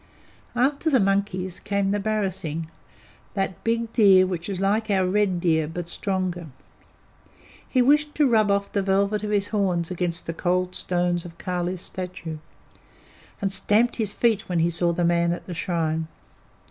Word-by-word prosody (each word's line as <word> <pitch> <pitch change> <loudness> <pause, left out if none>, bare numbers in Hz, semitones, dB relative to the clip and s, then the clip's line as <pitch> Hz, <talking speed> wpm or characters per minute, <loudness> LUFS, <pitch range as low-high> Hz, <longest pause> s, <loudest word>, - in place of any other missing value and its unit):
After 280 +6 +1
the 265 -4 +4
monkeys 195 -2 0
came 200 -1 -1
the 205 - 0
barasingh, 190 -7 -2 0.7
that 195 -3 -2
big 230 0 -1
deer 195 -5 +6
which 180 0 -4
is 190 -2 -3
like 210 +3 +1
our 190 -2 +2
red 190 -2 +1
deer, 160 -3 +2
but 170 +2 -5
stronger. 180 -2 -2 1.2
He 255 -2 +3
wished 295 +3 +3
to 300 - +3
rub 220 -4 +3
off 200 0 0
the 200 - 0
velvet 200 +2 +1
of 210 - -2
his 205 -1 0
horns 185 -5 0
against 175 -1 -2
the 165 - -3
cold 180 +2 0
stones 175 -1 0
of 170 -1 -11
Kali's 180 0 -3
statue, 180 -4 -5 1.0
and 195 - +1
stamped 215 +4 +2
his 215 -4 -1
feet 225 -2 +1
when 180 - 0
he 165 +1 +2
saw 170 +1 +1
the 170 0 0
man 170 0 +2
at 175 - -7
the 180 - -6
shrine. 160 -2 -1
190 Hz, 165 wpm, -24 LUFS, 175-205 Hz, 1.2 s, deer